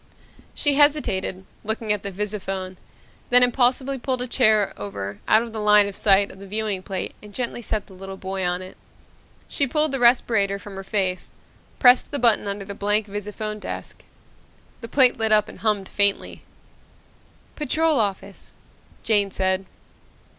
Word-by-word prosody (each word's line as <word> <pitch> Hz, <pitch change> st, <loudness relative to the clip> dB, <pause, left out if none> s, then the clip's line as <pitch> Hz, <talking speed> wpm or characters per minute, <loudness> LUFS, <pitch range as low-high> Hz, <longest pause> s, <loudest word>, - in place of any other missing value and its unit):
She 290 Hz, -2 st, +2 dB
hesitated, 275 Hz, -11 st, +1 dB, 0.2 s
looked 220 Hz, +2 st, -2 dB
at 210 Hz, -2 st, 0 dB
the 200 Hz, -, -5 dB
visiphone, 195 Hz, -2 st, -4 dB, 0.5 s
then 250 Hz, 0 st, +6 dB
impulsively 255 Hz, +2 st, +1 dB
pulled 255 Hz, 0 st, -2 dB
a -, -, -4 dB
chair 215 Hz, -5 st, +3 dB
over 100 Hz, 0 st, -6 dB
out 220 Hz, +2 st, +4 dB
of 230 Hz, -2 st, -9 dB
the 220 Hz, -, -4 dB
line 210 Hz, -1 st, +5 dB
of 200 Hz, -, -6 dB
sight 200 Hz, 0 st, +3 dB
of 190 Hz, -, -15 dB
the 200 Hz, -, -11 dB
viewing 210 Hz, -1 st, -1 dB
plate 190 Hz, -1 st, -5 dB
and 210 Hz, -, -13 dB
gently 240 Hz, +1 st, -4 dB
set 215 Hz, -2 st, -3 dB
the 195 Hz, -, -16 dB
little 195 Hz, +1 st, -9 dB
boy 190 Hz, 0 st, -4 dB
on 180 Hz, +1 st, -1 dB
it. 185 Hz, -, -12 dB, 0.7 s
She 280 Hz, -, 0 dB
pulled 305 Hz, +3 st, 0 dB
the 270 Hz, -, -2 dB
respirator 225 Hz, -5 st, +3 dB
from 200 Hz, +1 st, -11 dB
her 195 Hz, 0 st, -7 dB
face, 190 Hz, -2 st, -1 dB, 0.4 s
pressed 245 Hz, 0 st, +5 dB
the 290 Hz, -, -3 dB
button 230 Hz, -5 st, +2 dB
under 200 Hz, 0 st, -4 dB
the 200 Hz, -, -7 dB
blank 205 Hz, +1 st, +1 dB
visiphone 210 Hz, +1 st, -5 dB
disk. -, -, -6 dB, 0.8 s
The 230 Hz, -, -7 dB
plate 255 Hz, +1 st, +4 dB
lit 220 Hz, -1 st, 0 dB
up 210 Hz, -1 st, +4 dB
and -, -, -12 dB
hummed 210 Hz, -3 st, -1 dB
faintly. 200 Hz, -1 st, 0 dB, 1.1 s
"Patrol 310 Hz, 0 st, +1 dB
Office," 200 Hz, -2 st, -4 dB, 0.5 s
Jane 205 Hz, -3 st, +2 dB
said. 190 Hz, 0 st, -1 dB
210 Hz, 165 wpm, -23 LUFS, 195-240 Hz, 1.1 s, then